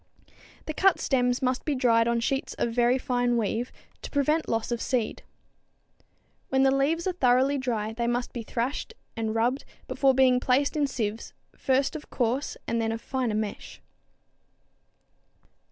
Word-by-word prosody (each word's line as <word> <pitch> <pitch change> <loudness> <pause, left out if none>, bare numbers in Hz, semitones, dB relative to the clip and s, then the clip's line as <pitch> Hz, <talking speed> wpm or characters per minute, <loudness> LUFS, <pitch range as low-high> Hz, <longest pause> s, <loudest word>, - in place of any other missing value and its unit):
The 310 - -4
cut 385 +5 +3
stems 250 -1 +1
must 255 0 0
be 295 - -1
dried 230 -3 +3
on 235 0 +1
sheets 270 +3 -2
of 235 - -1
very 240 +1 +3
fine 245 -2 0
weave, 230 +2 -1 0.3
to - - -7
prevent 300 +3 +1
loss 225 +1 -1
of 235 - -2
seed. 245 -5 -1 1.3
When 265 0 +3
the 270 0 +4
leaves 315 +5 +1
are 375 - +1
thoroughly 265 -2 +3
dry 225 -4 -2
they 235 +1 -2
must 245 +1 -2
be 240 - -4
thrashed 250 - -3 0.2
and 220 -1 -2
rubbed 245 +5 +1 0.2
before 270 -2 +2
being 255 -1 +4
placed 265 +4 +1
in 295 -2 +2
sieves, 225 -4 -4 0.2
first 270 +3 +1
of 305 - -8
coarse, 250 +3 -1
and 230 0 0
then 225 0 0
of 225 - -3
finer 245 -2 -2
mesh. 215 -1 -4
250 Hz, 160 wpm, -27 LUFS, 230-270 Hz, 1.3 s, the